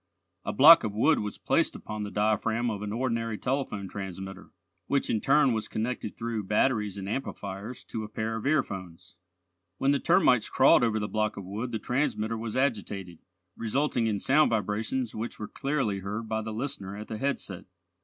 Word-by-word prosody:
A - - -2
block 155 +9 +9
of 105 -2 -3
wood 110 - +4
was 105 0 -4
placed - - +1
upon 105 0 -6
the 105 - -3
diaphragm 110 +3 +1
of 105 -2 -5
an 105 0 -4
ordinary 115 -2 -1
telephone 125 -7 -2
transmitter, 95 0 -7 0.4
which 140 -1 +1
in 110 - 0
turn 140 -2 +4
was 110 -1 -2
connected 110 -1 -3
through 115 -3 -3
batteries 105 -1 +1
and 95 -1 -5
amplifiers 105 -1 -5
to 110 - -5
a 105 - -7
pair 110 +1 -3
of 110 +4 -3
earphones. 95 - -2 0.6
When 135 - +2
the 140 - +2
termites 125 -4 +4
crawled 130 - +5
over 115 -2 +2
the 105 - -2
block 110 0 -1
of 100 - -6
wood 110 +6 -4
the 115 - -1
transmitter 115 -3 -1
was 115 +1 -4
agitated, 100 - -2 0.4
resulting 120 0 0
in 105 -2 0
sound 150 +7 +4
vibrations 110 +3 -1
which 110 +2 -4
were 105 - -5
clearly 135 -9 -1
heard 105 +4 -4
by 110 0 -1
the 110 0 -5
listener 110 -5 -4
at 105 - -7
the 110 - -5
headset. 135 -9 -3
110 Hz, 185 wpm, -28 LUFS, 105-125 Hz, 0.6 s, block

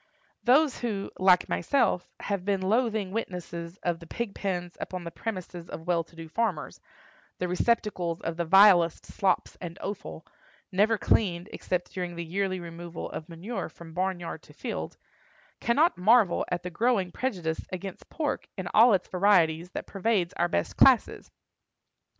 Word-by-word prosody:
Those 275 +3 +4
who, 210 -5 -3
like 185 -1 +5
myself, 270 -10 +1
have 200 -3 -2
been 195 -1 0
loathing 215 -1 +1
witnesses 175 -4 -5
of 170 -2 0
the 165 - -12
pig 235 +1 -4
pens 180 -3 -3
upon 185 -1 -5
the 170 - -6
premises 180 -4 -6
of 160 - -7
well 175 -2 +1
to 170 - -22
do 165 0 -8
farmers—the 180 -1 -5
receptacles 180 -3 0
of 165 - -3
the 170 - -1
vilest 180 -2 +6
slops 190 -2 0
and 175 0 -6
offal, 200 0 -6 0.5
never 210 +4 +3
cleaned 185 -3 +1
except 180 -1 -3
during 180 -2 -4
the 170 0 -5
yearly 185 +2 -1
removal 170 0 -7
of 160 +2 -7
manure 180 +8 -5
from 165 -1 -13
barnyard 180 -1 -2
to - - -17
field—cannot 285 - -2
marvel 210 -1 +4
at 180 -1 -2
the 180 - -5
growing 200 -2 +1
prejudice 175 -9 -2
against 185 +1 -7
pork 300 -4 -2
in 190 -2 -4
all 225 0 +7
its 185 - -2
varieties 180 -3 +3
that - - -6
pervades 195 -3 0
our 175 - +1
best 85 - -2
classes. - - +4
185 Hz, 150 wpm, -28 LUFS, 170-210 Hz, 0.5 s, all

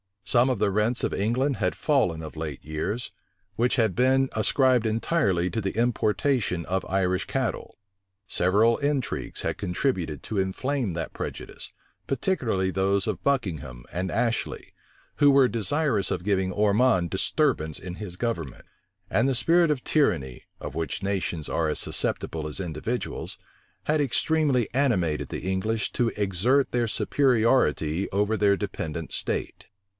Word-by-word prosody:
Some 120 +6 +4
of 125 -5 0
the 100 -1 +2
rents 105 +5 +1
of - - 0
England 125 +7 0
had 90 - 0
fallen 90 - +1
of 80 0 -8
late 75 -4 -5
years, 80 +10 -3 0.5
which 120 +2 +2
had 110 -6 +2
been 130 +2 +3
ascribed 125 +2 +3
entirely 110 - +1
to 110 - -1
the 95 -1 -3
importation 110 - +1
of 95 +1 -1
Irish 95 -1 +1
cattle: - - -3 0.5
several 105 +6 +3
intrigues 140 -3 -2
had - - -2
contributed 90 - -2
to 105 - -2
inflame 115 +3 -1
that 80 -1 -4
prejudice, - - -6 0.3
particularly 120 - 0
those 95 +1 +1
of 100 -5 -2
Buckingham 80 - -1
and 90 +2 -2
Ashley, 115 +7 -2 0.4
who 145 -1 +6
were 135 -2 +5
desirous 115 - 0
of 85 - -2
giving 95 -2 +1
Ormond 105 -2 +3
disturbance 80 0 0
in 90 -1 -7
his 90 -3 -7
government: 90 - -3 0.4
and 115 +4 +2
the 135 - +1
spirit 170 +5 +4
of 145 -4 0
tyranny, 65 - 0 0.2
of - - -6
which 80 +3 -3
nations 95 -5 -2
are 80 - 0
as 75 - -1
susceptible 80 -2 -2
as 75 - -5
individuals, 90 +8 -4 0.5
had 155 +1 +1
extremely 140 -3 +1
animated 100 - +1
the - - -5
English 95 +4 -1
to 120 - +1
exert 105 +8 +2
their 120 -1 +1
superiority 110 - +2
over 105 +3 +1
their 100 -1 +4
dependent 85 -5 -4
state. - - -3
105 Hz, 145 wpm, -26 LUFS, 90-125 Hz, 0.5 s, who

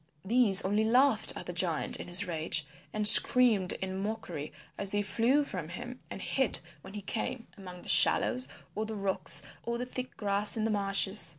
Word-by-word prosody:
These 215 -3 +3
only 205 +3 0
laughed 255 +5 +2
at - - -9
the - - -7
giant - - -1
in - - -9
his 180 +3 0
rage 160 -2 -2 0.3
and 210 -1 +3
screamed 220 -3 +7
in 190 0 -5
mockery 195 -8 -6 0.2
as 200 - -4
they 205 +1 -1
flew 235 +8 +1
from 180 - -7
him 245 +8 -9
and - - -8
hid - - -1 0.2
when 200 - -13
he 205 - -8
came, 230 +4 -5
among 180 -3 -12
the - - -12
shallows 255 0 +3 0.3
or 215 +1 -4
the 220 - -6
rocks 190 -7 0 0.2
or 235 0 -4
the 245 - -5
thick 255 0 -8
grass 205 +1 0
in 220 - -2
the 225 - -1
marshes. 195 -3 +2
205 Hz, 190 wpm, -29 LUFS, 190-230 Hz, 0.3 s, screamed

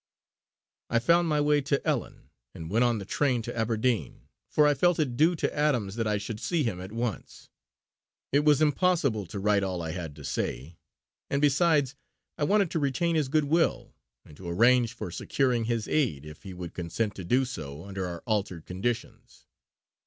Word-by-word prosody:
I 115 - +2
found 170 +8 +3
my 150 -2 +1
way 145 0 +3
to 140 0 0
Ellon - - -3 0.2
and 80 +1 -7
went 115 +4 +3
on 120 -2 +2
the 100 - -6
train 125 +1 0
to 120 - -6
Aberdeen, 115 +1 -1 0.2
for 150 - +4
I 145 - +5
felt 175 +5 +2
it 140 -7 0
due 160 +7 +4
to - - -2
Adams 125 -10 +1
that 115 -1 -1
I 105 -1 +1
should 105 +1 -5
see 165 +5 0
him 95 -7 -2
at 95 +2 -8
once. 115 -1 -5 0.8
It 140 - +4
was 150 0 +4
impossible 145 - +1
to 100 - -7
write 100 0 +2
all 95 -2 -2
I 80 - -3
had 80 -4 -6
to 75 - -12
say; 70 +5 -4 0.5
and 140 - 0
besides 145 -1 +3 0.4
I 145 - 0
wanted 200 +1 +2
to 165 - 0
retain 155 +4 0
his 150 -4 +1
good 155 +1 +2
will, 165 +3 +1 0.3
and 75 - -15
to 90 -2 -7
arrange 120 +5 +4
for 105 -7 -6
securing 125 +3 0
his 115 -2 -1
aid, 110 - 0
if 75 0 -11
he 95 -2 -9
would 90 -1 -7
consent 95 +5 -2
to 95 - -6
do 125 +9 +2
so 75 - -7
under 95 -2 -4
our 85 -1 -7
altered 100 -7 -2
conditions. 115 +6 -5
120 Hz, 190 wpm, -28 LUFS, 95-145 Hz, 0.8 s, I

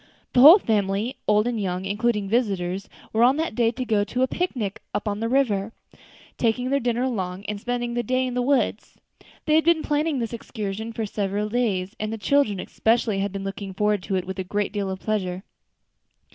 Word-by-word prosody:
The 245 - +5
whole 310 +8 +11
family, 210 - -1
old 210 0 +4
and 240 -3 -1
young, 185 -1 -2
including 210 0 0
visitors, 195 -4 -1 0.2
were 220 - +2
on 255 +4 +5
that 320 -4 -1
day 230 0 +2
to 255 +2 -4
go 220 -3 +2
on 205 - 0 0.2
a - - +6
picnic 250 - -3
up - - -1
the 210 +2 -2
river, 225 -5 +1 0.7
taking 250 +2 +1
their 280 - +3
dinner 240 -1 0
along, 195 -6 -3
and 205 -1 -4
spending 240 0 -2
the 240 - 0
day 255 +3 0
in 250 - -3
the 250 - 0
woods. 245 -4 0 0.5
They 305 - +2
had 315 +1 +5
been 335 -1 +3
planning 300 0 0
this 235 -1 -3
excursion 220 -1 -5
for 225 -1 -3
several 205 0 -2
days, 210 -4 -1
and 215 0 -2
the 225 - -3
children 220 -2 +2
especially 220 0 +1
had 200 0 -1
been 195 0 -5
looking 195 0 -6
forward 210 0 +1
to 190 - -3
it 185 - -1
with 190 +1 -6
a - - -1
great 205 +2 -2
deal 200 -2 -2
of 190 0 -4
pleasure. 190 -4 -2
215 Hz, 205 wpm, -24 LUFS, 200-245 Hz, 0.7 s, whole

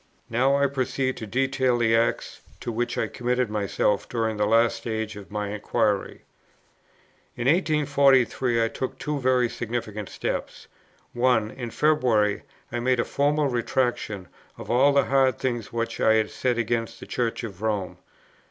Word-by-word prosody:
Now 130 +4 +3
I 140 0 +3
proceed 130 -1 -1
to 110 - -6
detail 130 +1 +1
the 115 -1 +3
acts, 115 +1 0 0.2
to 120 - -3
which 120 +2 -2
I - - +1
committed 125 -1 -1
myself 105 -1 0
during 110 -2 -1
this 105 0 +1
last 115 +2 +3
stage 110 -2 -4
of 105 -1 -10
my 105 -1 -3
inquiry. 105 -1 -1 1.1
In 120 - -4
1843, 140 -6 +3
I - - +2
took 130 +3 -5
two 150 -1 -3
very 130 -1 +2
significant 110 -3 -4
steps: - - -4 0.5
1. 120 -3 +2
In 120 -3 -6
February, 120 -8 +2 0.3
I 120 - -2
made 125 0 +1
a - - +1
formal 145 +1 +1
Retractation 120 -6 -1 0.3
of - - -6
all 130 +4 +5
the 140 0 +4
hard 135 -3 +3
things 120 -5 -3
which 115 0 -3
I 110 - +5
had 110 -1 +1
said 125 -2 -1
against 115 0 -2
the - - -9
Church 120 -2 -2
of 100 -4 -7
Rome. 105 -4 -2
120 Hz, 160 wpm, -25 LUFS, 110-130 Hz, 1.1 s, all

